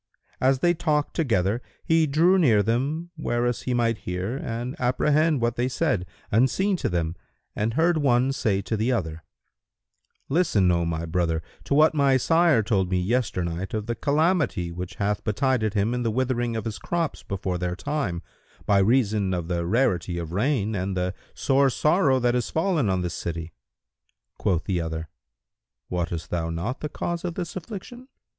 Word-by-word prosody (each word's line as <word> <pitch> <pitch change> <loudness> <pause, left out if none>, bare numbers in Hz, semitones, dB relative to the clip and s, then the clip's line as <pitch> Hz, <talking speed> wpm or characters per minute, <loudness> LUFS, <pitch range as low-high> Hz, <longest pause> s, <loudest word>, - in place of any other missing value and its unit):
As 130 0 +2
they 175 0 +4
talked 150 -3 0
together 115 - +1 0.2
he 160 -1 +3
drew 170 +7 +4
near 115 - +4
them 140 +10 -1
whereas 120 -4 -1
he 125 - -1
might 115 -2 +1
hear 90 +6 -3
and 120 -1 -4
apprehend 150 +4 +2
what 120 0 0
they 120 +1 +1
said, 100 -7 0 0.2
unseen 135 - +2
of - - +1
them, 85 -1 -1 0.4
and 110 +2 -1
heard 165 +1 +3
one 130 -2 +3
say 100 -7 0
to 110 - -2
the 110 +4 0
other, 80 -8 -2 1.0
"Listen, 120 - +3
O 85 -1 +1
my 85 0 -2
brother, 80 -1 0 0.2
to 140 - +1
what 155 +2 +5
my 140 -3 +4
sire 165 -3 +3
told 95 -4 +1
me 90 -1 +1
yesternight 90 -4 -1
of 105 -1 -2
the 120 - -1
calamity 140 - +1
which 90 +3 -6
hath 105 0 -1
betided 110 -1 0
him 105 +3 +1
in 125 - -1
the 115 - 0
withering 120 0 0
of 110 -1 -3
his 110 -2 -4
crops 170 -2 -2
before 95 -2 -3
their 90 0 -2
time, 90 - -3 0.4
by 100 -1 +4
reason 105 -3 +2
of 85 -1 -4
the 85 -1 -1
rarity 90 -6 +1
of 85 -2 -5
rain 110 +1 0
and 95 -1 -2
the 90 +1 -1 0.2
sore 135 0 +3
sorrow 150 -1 +3
that 120 -1 +2
is 125 -2 -1
fallen 160 - +1
on 95 -1 0
this 85 -1 -3
city." 85 -2 -5 0.9
Quoth 90 -5 +1
the 90 -3 -1
other, 80 -1 -4 0.8
"Wottest 85 -3 -3
thou 85 -2 -1
not 85 +10 -3
the 150 - -4
cause 170 +3 -3
of 175 -2 -3
this 175 -2 -5
affliction?" 225 +7 -8
115 Hz, 175 wpm, -25 LUFS, 90-140 Hz, 1.0 s, what